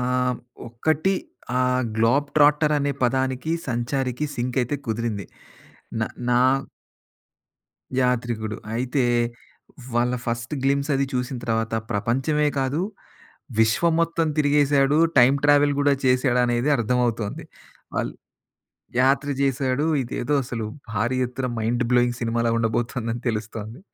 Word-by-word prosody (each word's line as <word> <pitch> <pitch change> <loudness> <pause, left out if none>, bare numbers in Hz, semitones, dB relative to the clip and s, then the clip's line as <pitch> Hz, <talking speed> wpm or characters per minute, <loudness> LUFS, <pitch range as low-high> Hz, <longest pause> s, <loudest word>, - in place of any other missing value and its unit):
ఆహ్, 125 0 0 0.3
ఒక్కటి 155 +10 0 0.5
ఆహ్, 125 0 +2
గ్లోబ్ 120 +6 +2
ట్రాక్టర్ 150 +1 +5
అనే 145 0 0
పదానికి 130 +4 0 0.2
సంచారికి 125 +3 -1
సింక్ 125 +1 -3
అయితే 125 +4 -2
కుదిరింది. 110 -3 -2 0.8
న - - +1 0.3
నా 120 0 +4 1.6
యాత్రికుడు. 115 -4 -1 0.2
అయితే 125 +3 0 0.9
వాళ్ళ 120 +1 +2
ఫస్ట్ 115 +3 -2
గ్లిమ్స్ 140 +2 +1
అది 135 0 +2
చూసిన 125 +1 -2
తర్వాత 115 -1 -1 0.2
ప్రపంచమే 135 +8 +1
కాదు. 135 +4 0 0.8
విశ్వం 115 +10 +3
మొత్తం 165 0 0
తిరిగేసాడు 145 -1 +3 0.2
టైమ్ 130 +3 +6
ట్రావెల్ 145 0 +5
కూడా 145 0 +4
చేసాడు 125 -1 +3
అనేది 120 +3 0
అర్థమవుతుంది. 120 -2 -1 0.5
ఆల్ - - -2 0.9
యాత్ర 135 +2 +2
చేసాడు 135 +1 +1 0.2
ఇదేదో 125 +3 -3
అసలు 115 -3 -4 0.3
భారీ 115 +4 0
ఎత్తున 125 +1 -4
మైండ్ 120 +3 0
బ్లోయింగ్ 120 -1 +3
సినిమాలా 115 0 0
ఉండబోతుందని 115 +1 -1
తెలుస్తోంది. 110 +1 -5
125 Hz, 110 wpm, -23 LUFS, 115-140 Hz, 1.6 s, టైమ్